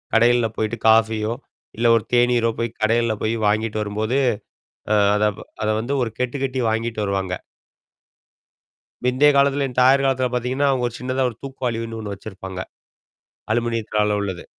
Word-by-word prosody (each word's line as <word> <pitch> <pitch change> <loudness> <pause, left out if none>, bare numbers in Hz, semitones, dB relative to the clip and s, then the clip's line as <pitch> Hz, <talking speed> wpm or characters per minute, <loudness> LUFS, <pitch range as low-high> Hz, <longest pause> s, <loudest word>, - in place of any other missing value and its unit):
கடையல 120 0 +4
போயி்டு 110 +2 -2
காஃபியோ 110 0 +3 0.4
இல்ல 120 +1 +2
ஒரு 115 - +1
தேநீரோ 120 -1 +3
போய் 115 0 -3
கடையல 115 +1 +2
போய் 110 +1 0
வாங்கிட்டு 110 +1 0
வரும்போது. 110 +4 -1 0.8
அ - - +4 0.2
அத 105 - +1 0.4
அத 105 - 0
வந்து 120 +5 -3
ஒரு 115 - -1
கெட்டு 125 +2 -1
கெட்டி 130 -1 -2
வாங்கிட்டு 115 0 -2
வருவாங்க. 95 -2 -1 1.7
பிந்தைய 130 +4 +4
காலத்துல 140 0 +3
என் 125 -1 -11
தாயார் 135 +2 +5
காலத்தல 130 -1 +1
பார்த்தீங்கன்னா, 130 +3 0
அவங்க 125 -2 0
ஒரு 120 - -10
சின்னதா 130 +1 -1
ஒரு 115 - -11
தூக்கு 135 -1 -8
வாலின்னு 115 -1 -3
ஒண்ணு 105 -2 -5
வெச்சிருப்பாங்க. 95 -2 -8 0.9
அலுமினியத்தால 110 -3 0
உள்ளது. 95 -3 -5
115 Hz, 150 wpm, -22 LUFS, 110-125 Hz, 1.7 s, தாயார்